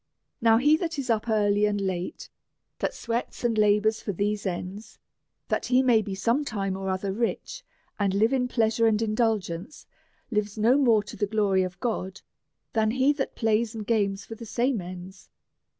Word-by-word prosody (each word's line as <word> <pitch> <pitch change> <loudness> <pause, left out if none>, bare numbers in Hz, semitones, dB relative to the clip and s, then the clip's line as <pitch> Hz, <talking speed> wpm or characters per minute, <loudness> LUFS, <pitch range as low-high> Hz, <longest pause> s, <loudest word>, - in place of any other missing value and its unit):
Now, 225 -1 +5
he 295 +6 +4
that 335 -1 -3
is 260 -4 -1
up 225 +1 0
early 210 -1 +3
and 205 -1 -1
late, 185 -2 -3 0.5
that - - -2
sweats 235 +1 -4
and 235 -2 +1
labours 215 +1 +3
for 205 - -3
these 205 +2 -1
ends, 185 +4 -6 0.5
that - - -1
he 255 +1 +4
may 240 -4 +4
be 200 -2 -5
some 235 +9 +1
time 195 -7 -2
or 190 0 -4
other 190 +1 -2
rich, 240 - -3 0.4
and 200 -2 +2
live 220 +6 +3
in 250 -2 +1
pleasure 230 -1 +2
and 215 -1 +2
indulgence, 215 - -1 0.5
lives 210 -1 -1
no 225 +4 +4
more 235 -7 +4
to 210 - -10
the 205 - -1
glory 200 -3 +2
of 185 0 -4
God 195 -6 -3 0.5
than 220 -1 +2
he 260 +5 +3
that 280 -2 -4
plays 225 0 +1
and 215 -2 -5
games 200 -4 0
for - - -8
the 225 - -9
same 240 -1 0
ends. 185 +2 -10
215 Hz, 180 wpm, -26 LUFS, 200-235 Hz, 0.5 s, Now